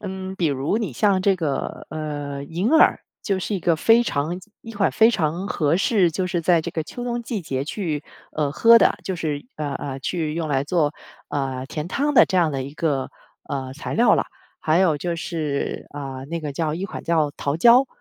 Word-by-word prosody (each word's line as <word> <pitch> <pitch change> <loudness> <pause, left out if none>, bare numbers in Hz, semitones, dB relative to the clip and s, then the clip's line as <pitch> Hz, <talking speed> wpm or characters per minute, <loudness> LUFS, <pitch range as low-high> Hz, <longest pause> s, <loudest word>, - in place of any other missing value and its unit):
嗯， 190 -1 -5
比 170 - +1
如 140 +6 0
你 205 - -3
像 190 - +2
这 195 -1 +3
个， 150 -6 -3
呃， 145 -2 -4
银 175 - -1
耳 320 - +5 0.2
就 195 -3 0
是 195 +3 -3
一 190 - -2
个 170 -1 +2
非 225 +8 +5
常 160 -4 -2 0.2
一 230 - -10
款 200 -2 +1
非 225 +1 +5
常 170 -2 -1
合 155 -2 +1
适， 195 -2 +3
就 180 +3 -2
是 175 -1 -1
在 170 0 +3
这 - - -5
个 160 - -2
秋 245 - -8
冬 240 -1 -2
季 230 -3 -3
节 135 -5 -3
去， 155 -3 -3 0.3
呃， 150 -2 -1
喝 230 +9 +7
的， - - +3
就 190 - -3
是 150 -1 -3
呃 145 -2 -3
呃， 135 -1 -5
去 155 +1 -2
用 165 -1 -2
来 135 -2 +1
做， 150 -1 +1 0.4
呃， 135 -2 -2
甜 150 +4 -5
汤 290 +9 0
的 - - +7
这 185 - -1
样 170 -3 +3
的 135 -1 -2
一 140 +3 -8
个， 145 -5 -1 0.4
呃， 130 -2 -4
材 155 - -5
料 235 +3 +5
了。 - - +1 0.4
还 155 +2 +2
有 170 -6 +3
就 175 +2 -2
是， 155 -4 -3
啊， 135 -2 -6
那 165 +3 -4
个 150 -2 -4
叫 155 +1 -1
一 180 - -4
款 195 - -6
叫 160 -3 +2
桃 140 +2 -1
胶， 240 +8 +6
165 Hz, 230 characters per minute, -23 LUFS, 145-190 Hz, 0.4 s, 喝